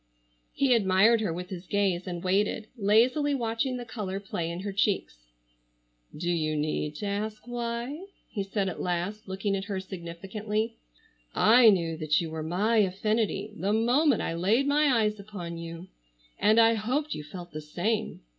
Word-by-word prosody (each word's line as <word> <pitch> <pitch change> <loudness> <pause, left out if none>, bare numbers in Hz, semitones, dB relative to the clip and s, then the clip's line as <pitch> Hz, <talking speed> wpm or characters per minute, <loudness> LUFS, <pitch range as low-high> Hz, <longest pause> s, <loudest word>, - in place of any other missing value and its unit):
He 275 -2 +3
admired 215 +1 +4
her 205 -6 0
with 180 +2 -5
his 180 -1 -7
gaze, 190 -3 0
and 175 -1 -5
waited, 205 +3 +1
lazily 250 +7 +3
watching 245 +1 -1
the 245 - -6
color 205 -4 -4
play 175 -4 -4
in 170 +2 -5
her 200 +1 -4
cheeks. 190 - -1 0.9
"Do 175 +3 -1
you 155 -2 0
need 150 0 -2
to 210 - -5
ask 210 +2 -3
why?" 240 +8 -4 0.2
he 205 - -4
said 195 0 -1
at 185 - -4
last, 180 +4 -2
looking 195 +1 -1
at 195 0 -3
her 200 -2 -3
significantly. 195 +5 -4 0.6
"I 230 +1 +7
knew 165 -5 +1
that 155 -1 +2
you 165 -2 -4
were 160 0 -4
my 195 +8 +1
affinity 210 +1 0
the 200 0 -1
moment 245 +4 +3
I - - -2
laid 205 +11 +2
my 295 +1 +3
eyes 215 -5 +2
upon 180 -5 -7
you, 165 +1 -7 0.5
and 215 +2 +5
I 230 0 +6
hoped 255 +8 -1
you 150 - -6
felt 175 +4 -9
the 155 - -6
same. 205 +9 -2
205 Hz, 170 wpm, -28 LUFS, 175-225 Hz, 0.9 s, I